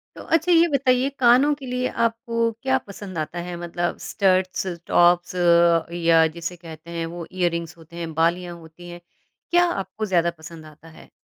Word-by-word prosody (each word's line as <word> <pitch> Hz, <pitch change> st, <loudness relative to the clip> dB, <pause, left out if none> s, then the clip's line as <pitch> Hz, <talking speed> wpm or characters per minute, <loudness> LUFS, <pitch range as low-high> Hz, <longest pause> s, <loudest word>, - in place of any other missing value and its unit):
तो -, -, -10 dB
अच्छा 330 Hz, +2 st, +1 dB
ये 335 Hz, 0 st, +5 dB
बताइए 260 Hz, 0 st, +2 dB
कानों 255 Hz, +4 st, +5 dB
के 280 Hz, -2 st, -11 dB
लिए 250 Hz, 0 st, -2 dB, 0.2 s
आपको 230 Hz, 0 st, 0 dB
क्या 265 Hz, 0 st, +2 dB
पसंद 195 Hz, -3 st, -9 dB
आता 155 Hz, +3 st, -4 dB
है 175 Hz, -, -5 dB
मतलब 175 Hz, 0 st, -3 dB
स्टड्स, 185 Hz, -2 st, 0 dB, 0.2 s
टॉप्स 175 Hz, +1 st, +3 dB, 0.7 s
या 165 Hz, -1 st, +5 dB
जिसे 170 Hz, +1 st, -5 dB
कहते 165 Hz, -1 st, -12 dB
हैं 165 Hz, -1 st, -3 dB
वो 170 Hz, -1 st, -6 dB
इयररिंग्स 170 Hz, -3 st, -2 dB
होते 165 Hz, +1 st, -16 dB
हैं, 165 Hz, -2 st, -6 dB
बालियाँ 175 Hz, +2 st, 0 dB
होती 165 Hz, +2 st, -14 dB
हैं। 175 Hz, 0 st, -10 dB, 0.5 s
क्या 350 Hz, 0 st, +5 dB
आपको 195 Hz, -, -4 dB
ज़्यादा 170 Hz, -4 st, +1 dB
पसंद 160 Hz, 0 st, -11 dB
आता 155 Hz, +1 st, -16 dB
है? 160 Hz, -, -16 dB
175 Hz, 170 wpm, -23 LUFS, 170-230 Hz, 0.7 s, ये